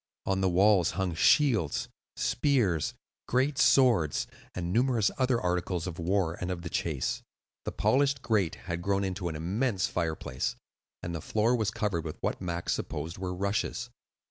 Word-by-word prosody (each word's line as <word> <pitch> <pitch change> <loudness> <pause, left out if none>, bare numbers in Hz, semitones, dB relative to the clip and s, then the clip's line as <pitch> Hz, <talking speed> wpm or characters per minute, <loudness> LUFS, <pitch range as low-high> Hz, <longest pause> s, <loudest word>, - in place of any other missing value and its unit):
On 95 0 0
the 95 - +3
walls 95 -1 +4
hung 95 -3 0
shields, 85 - +3 0.3
spears, 110 - +1 0.3
great 130 +3 +1
swords, 115 - +4 0.3
and 90 -1 -3
numerous 120 -3 +2
other 130 -2 +2
articles 90 -2 -1
of 90 -2 -6
war 85 -1 0
and 90 - -2
of 90 -2 -4
the 85 - -6
chase. 75 -7 -1 0.4
The - - -2
polished 140 0 +2
grate 100 -7 +1
had 85 -2 -3
grown 100 +1 +1
into 95 -1 -2
an 80 - -5
immense 95 +6 0
fireplace, 80 -7 -2 0.5
and 85 - -4
the 80 - -4
floor 110 +8 +2
was 110 -3 0
covered 105 -7 -1
with 80 - -6
what - - -2
Max 85 -1 -2
supposed 80 +4 -4
were 95 -1 -3
rushes. 100 +5 -2
95 Hz, 160 wpm, -29 LUFS, 85-115 Hz, 0.5 s, walls